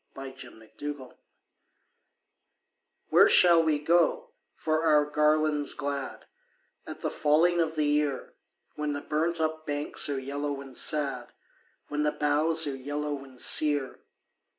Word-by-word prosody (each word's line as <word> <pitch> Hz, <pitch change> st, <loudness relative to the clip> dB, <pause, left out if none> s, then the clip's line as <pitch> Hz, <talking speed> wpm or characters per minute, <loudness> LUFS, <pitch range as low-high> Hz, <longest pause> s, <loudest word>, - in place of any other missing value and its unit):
A 135 Hz, -1 st, -9 dB
Song 125 Hz, -4 st, -13 dB
of 110 Hz, -, -22 dB, 0.3 s
Autumn 130 Hz, -1 st, -14 dB, 1.9 s
"Where -, -, +5 dB
shall 170 Hz, -2 st, +6 dB
we 160 Hz, -2 st, 0 dB
go 165 Hz, +3 st, 0 dB, 0.2 s
for 155 Hz, 0 st, -2 dB
our 150 Hz, -2 st, +3 dB
garlands 150 Hz, 0 st, 0 dB
glad 140 Hz, -2 st, -5 dB, 0.6 s
At -, -, -9 dB
the -, -, -3 dB
falling 170 Hz, +4 st, +2 dB
of 160 Hz, -1 st, -2 dB
the 155 Hz, -1 st, 0 dB
year, 145 Hz, -2 st, -1 dB, 0.4 s
When 150 Hz, -1 st, -4 dB
the 145 Hz, -, -5 dB
burnt 165 Hz, +3 st, -2 dB
up 160 Hz, 0 st, -3 dB
banks 145 Hz, 0 st, -1 dB
are 140 Hz, -, -2 dB
yellow 140 Hz, +1 st, -5 dB
and 135 Hz, -2 st, -11 dB
sad, 145 Hz, 0 st, +2 dB, 0.6 s
When 150 Hz, 0 st, -3 dB
the 150 Hz, 0 st, +1 dB
boughs 155 Hz, +3 st, +1 dB
are 140 Hz, -2 st, -4 dB
yellow 145 Hz, +1 st, -5 dB
and 130 Hz, -2 st, -15 dB
sere? 145 Hz, -2 st, +3 dB
150 Hz, 140 wpm, -27 LUFS, 140-155 Hz, 1.9 s, shall